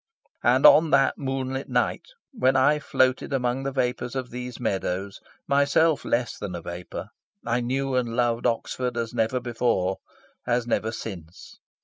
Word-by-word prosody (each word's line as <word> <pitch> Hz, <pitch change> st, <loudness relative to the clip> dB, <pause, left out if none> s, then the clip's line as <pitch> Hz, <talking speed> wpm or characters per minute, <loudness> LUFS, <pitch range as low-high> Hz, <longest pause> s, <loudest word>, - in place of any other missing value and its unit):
And -, -, +4 dB
on 160 Hz, +1 st, +8 dB
that 135 Hz, -2 st, +3 dB
moonlit 135 Hz, -1 st, -3 dB
night -, -, 0 dB, 0.2 s
when 135 Hz, -, +2 dB
I 145 Hz, +3 st, +4 dB
floated 130 Hz, -2 st, +1 dB
among 125 Hz, -1 st, 0 dB
the 135 Hz, 0 st, -3 dB
vapours 125 Hz, -1 st, -2 dB
of 130 Hz, -2 st, -4 dB
these 125 Hz, 0 st, -6 dB
meadows, 95 Hz, -3 st, -2 dB, 0.3 s
myself 140 Hz, +3 st, +3 dB
less 120 Hz, 0 st, -1 dB
than 95 Hz, -4 st, -5 dB
a 85 Hz, -, -5 dB
vapour, 85 Hz, +1 st, -7 dB, 0.4 s
I 120 Hz, +1 st, 0 dB
knew 135 Hz, +2 st, -1 dB
and 120 Hz, -2 st, 0 dB
loved 120 Hz, -1 st, +1 dB
Oxford 120 Hz, +1 st, -2 dB
as 115 Hz, -1 st, -3 dB
never 115 Hz, +3 st, 0 dB
before, 115 Hz, -6 st, 0 dB, 0.5 s
as 120 Hz, -1 st, +1 dB
never 110 Hz, -1 st, 0 dB
since. 90 Hz, -7 st, -9 dB
125 Hz, 150 wpm, -25 LUFS, 115-135 Hz, 0.5 s, on